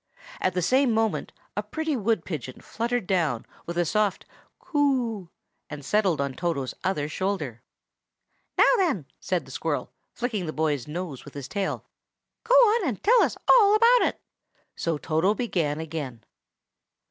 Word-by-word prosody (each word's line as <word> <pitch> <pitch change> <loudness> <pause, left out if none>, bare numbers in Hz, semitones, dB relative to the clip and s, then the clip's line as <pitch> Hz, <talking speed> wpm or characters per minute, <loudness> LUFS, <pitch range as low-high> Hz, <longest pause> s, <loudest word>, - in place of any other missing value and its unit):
At 185 - 0
the 180 - 0
same 260 +5 +3
moment 220 -1 0 0.2
a - - 0
pretty 315 -2 -2
wood 220 -6 0
pigeon 130 -7 -6
fluttered 235 -1 -2
down, 165 - 0 0.2
with 170 0 -4
a 175 - +2
soft 210 +2 0 0.3
"Coo!" 255 - 0 0.4
and 145 -2 -8
settled 195 -5 +2
on 140 -1 -1
Toto's 160 -5 -2
other 165 -6 0
shoulder. 155 - -3 1.0
"Now - - +7
then!" 315 - +1
said 180 -5 -1
the 130 - -12
squirrel, 155 +3 -2 0.2
flicking 225 -7 -3
the 155 - -3
boy's 150 -5 -1
nose 155 -3 -5
with 145 - -13
his 140 -2 -6
tail, 200 -2 -3 0.6
"go - - +3
on, 465 -6 +5
and 235 -7 -3
tell 475 +4 +6
us - - +1
all 425 -4 +7
about 470 +3 +6
it!" - - -4 0.6
So 165 -2 -1
Toto 165 +7 +1
began 170 -11 -1
again. 150 -7 -5
185 Hz, 155 wpm, -26 LUFS, 150-245 Hz, 1.0 s, Now